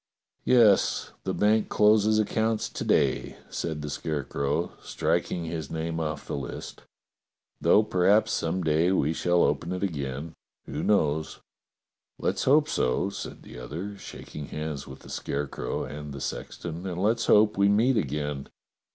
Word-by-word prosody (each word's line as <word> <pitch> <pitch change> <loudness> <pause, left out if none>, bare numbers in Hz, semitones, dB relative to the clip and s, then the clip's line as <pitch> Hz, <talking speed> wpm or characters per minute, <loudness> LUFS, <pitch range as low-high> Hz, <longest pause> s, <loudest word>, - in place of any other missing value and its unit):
"Yes, 115 -6 +4
the - - -1
bank 105 +1 +3
closes 105 0 +4
accounts 110 +1 0
to - - -5
day," - - +1
said 80 -3 -3
the 75 - -4
Scarecrow, 75 +2 -2
striking 85 -2 -1
his 80 -3 -4
name 80 +1 -3
off 75 -2 -3
the - - -4
list, 70 - -6 0.8
"though 105 - +5
per 90 -4 +2
haps 105 +2 +4
some 85 +3 -1
day 80 +3 +3
we 80 -4 +2
shall 90 +1 +2
open 85 - 0
it 90 +1 -3
again. 70 -3 -3 0.3
Who 75 +2 -4
knows? 80 -7 +1 0.4
" - - -63
"Let's - - -1
hope 150 +3 +5
so," 65 +10 0
said - - -7
the 60 - -10
other, 85 +11 -6
shaking 75 -6 -9
hands 75 -2 -5
with - - -10
the - - -13
Scarecrow 70 0 -3
and 75 -1 -7
the 70 - -6
sexton, 85 +6 -5
"and 90 -1 -4
let's 115 +4 +1
hope 105 0 +5
we 100 0 +4
meet 115 +6 +4
again. 75 - -2
85 Hz, 155 wpm, -27 LUFS, 75-105 Hz, 0.8 s, though